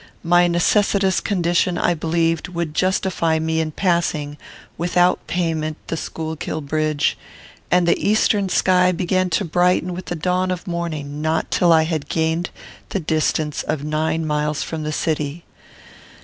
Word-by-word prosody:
My 175 +1 +4
necessitous 195 +2 +2
condition 175 -2 +1
I 175 - +2
believed 165 +1 0
would 170 -3 -4
justify 180 -2 +1
me 160 0 0
in 160 -1 -1
passing 160 -4 0 0.4
without 175 +1 +1
payment 160 -3 -1
the - - -1
Schuylkill 160 0 -4
bridge, 155 0 0 0.5
and 180 -1 +3
the - - +2
eastern 205 -2 +2
sky 180 0 +3
began 185 +1 0
to 185 +4 0
brighten 180 +1 +1
with 180 +1 -6
the 175 - -3
dawn 180 +3 0
of 180 -1 -3
morning 155 -5 -4
not 160 +1 -1
till 175 -1 +3
I 160 -1 +6
had 160 -2 -3
gained 160 +2 0 0.4
the 195 - -1
distance 155 -2 0
of 155 -2 -3
nine 155 +1 -1
miles 150 0 -1
from 160 -1 -5
the 155 0 -3
city. 155 +1 -2
165 Hz, 150 wpm, -21 LUFS, 155-180 Hz, 0.5 s, I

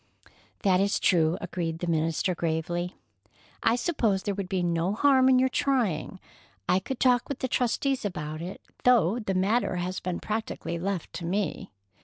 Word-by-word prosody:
"That 185 -2 +4
is 200 +1 +1
true," 165 -2 +3
agreed 165 -2 -3
the 175 - -4
minister 165 +2 0
gravely. 175 +2 -2 0.7
"I 225 - +3
suppose 235 - 0
there 205 - -1
would 195 -2 -4
be 185 -2 0
no 170 +2 0
harm 265 +2 +4
in 260 - +6
your 260 +1 +4
trying. 235 - 0 0.5
I 185 - +3
could 250 +7 -5
talk 250 -2 +3
with 280 - -3
the 260 - -2
trustees 255 +2 0
about 155 -6 -4
it, 180 +3 -7 0.2
though 235 -4 +4
the 195 -4 -2
matter 195 +2 +1
has 180 +1 -2
been 180 -1 -3
practically 215 -5 -3
left 190 -1 -3
to 170 - -5
me." 195 +3 -2
190 Hz, 170 wpm, -27 LUFS, 175-240 Hz, 0.7 s, in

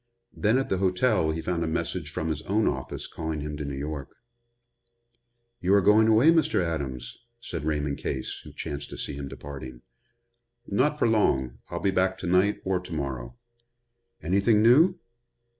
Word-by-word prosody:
Then 110 +4 +2
at 135 - -1
the 95 - 0
hotel 95 -1 +2
he 80 +1 -2
found 85 0 -1
a - - -1
message 80 - -2
from 80 - -3
his 80 -1 -2
own 105 +3 +2
office 65 -1 -3
calling 80 -2 -4
him 75 0 -4
to 75 - -4
New 70 -1 -4
York. 70 -1 -5 1.4
"You 95 +3 +3
are 100 - +5
going 110 +3 +5
away, 115 +8 +6
Mr. 160 -6 +2
Adams?" 70 -8 -3 0.2
said 85 -9 -6
Raymond 75 -2 -1
Case, 65 -2 -4
who - - -11
chanced 70 0 -6
to - - -8
see - - -4
him 70 0 -6
departing. 65 -3 -9 0.8
"Not 140 +9 +1
for - - +2
long. 65 - +1
I'll - - -3
be 100 - +2
back 95 0 +1
to - - -7
night 95 +4 +2
or 95 -1 +1
to 90 0 -11
morrow." 70 - -4 0.9
"Anything 100 +6 +3
new?" 160 +11 +6
85 Hz, 175 wpm, -27 LUFS, 70-105 Hz, 1.4 s, away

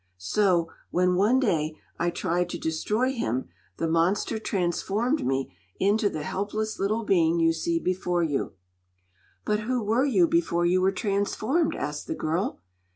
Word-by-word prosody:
So, 170 - +1 0.2
when 180 +1 +2
one 210 +8 +3
day 155 - 0 0.2
I 175 - +1
tried 175 0 -1
to 175 - -4
destroy 210 +11 0
him, 125 - -2 0.3
the 165 - -1
monster 175 +7 +1
transformed 210 - 0
me 135 -8 -1 0.2
into 205 +1 +3
the 155 -5 -5
helpless 215 +6 -3
little 215 +4 0
being 170 -4 +3
you 165 0 +4
see 335 - -1
before 180 - 0
you." 145 -4 -1 0.9
"But 210 0 +1
who 240 +2 -1
were 225 +6 +2
you 195 -11 +4
before 170 +1 +1
you 180 +2 +3
were 190 +1 +3
transformed?" 215 - 0
asked 150 0 -4
the - - -2
girl. 160 - -2
185 Hz, 155 wpm, -26 LUFS, 165-215 Hz, 0.9 s, you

